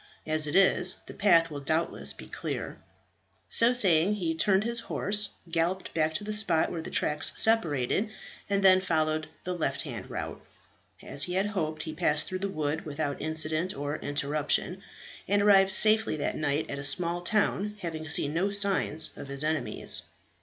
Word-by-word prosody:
As 155 -1 +2
it 145 - -3
is, 185 -1 +4
the - - -10
path 170 -5 +3
will 145 - -5
doubtless 155 +4 -1
be - - -10
clear." - - -6 0.7
So 230 +1 +5
saying, 195 -5 +3
he 170 -5 -2
turned 190 +5 +2
his 235 +1 -2
horse, 205 +1 0 0.2
galloped 170 +3 -1
back 160 -1 0
to 180 - -1
the 215 +1 -4
spot 210 -7 +2
where 170 - -4
the - - -7
tracks 150 0 0
separated, 200 - +3 0.4
and 200 0 0
then 185 -1 +6
followed 155 -3 -1 0.2
the 180 - -3
left 175 -3 -2
hand - - -8
route. - - -6 0.6
As 140 - +1
he 180 - -5
had 190 +2 +1
hoped, 160 -7 -3
he 155 - -6
passed 150 -1 0
through 185 -1 -5
the 200 +1 -3
wood 155 -3 -3
without 145 -1 -4
incident 155 +3 -1
or 145 +2 -4
interruption, 150 +6 -1 0.5
and 200 0 +2
arrived 195 -2 +5
safely 220 -3 +4
that 150 - -2
night 145 0 -1
at 140 - -5
a - - -6
small 170 +4 0
town, 210 +2 0
having 160 -3 -5
seen 155 -3 +2
no 180 +5 0
signs 195 -6 +1
of - - -9
his 140 +1 0
enemies. 155 -4 -2
165 Hz, 175 wpm, -28 LUFS, 155-195 Hz, 0.7 s, then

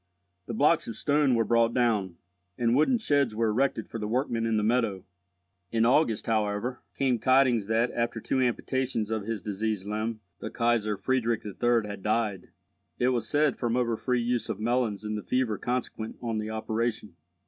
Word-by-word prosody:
The 115 - -4
blocks 150 +6 +3
of 115 - -5
stone 145 0 +2
were 115 - +3
brought 115 +1 +2
down, 110 -8 +1 0.4
and 120 0 +2
wooden 155 - +4
sheds 145 - +1
were 115 0 +1
erected 115 0 0
for 115 - -6
the 105 - -3
workmen 115 -1 0
in 110 -1 +1
the 105 - +1
meadow. 110 -5 0 0.7
In 115 0 +2
August, 120 -3 +2
however, 110 +2 -1
came 130 -3 +1
tidings 130 -3 +3
that, 115 +2 +1
after 115 -1 -2
two 130 +4 0
amputations 125 -2 -1
of 110 -3 -2
his 115 -3 -3
diseased 105 -1 -2
limb, 110 +1 -3 0.2
the - - -5
Kaisar 115 -3 +1
Friedrich 120 -3 0
III. 115 +2 +1
had 100 -1 -7
died—it 110 +3 -3
was 125 -3 -1
said 150 -2 +2
from 120 0 0
over 120 -2 +1
free 125 +1 0
use 120 0 -1
of 100 - -3
melons 115 -2 0
in 105 0 -3
the 105 - -3
fever 120 -3 -1
consequent 120 -3 -3
on 115 -2 -2
the 105 0 -4
operation. 110 -2 -2
115 Hz, 180 wpm, -28 LUFS, 110-125 Hz, 0.7 s, wooden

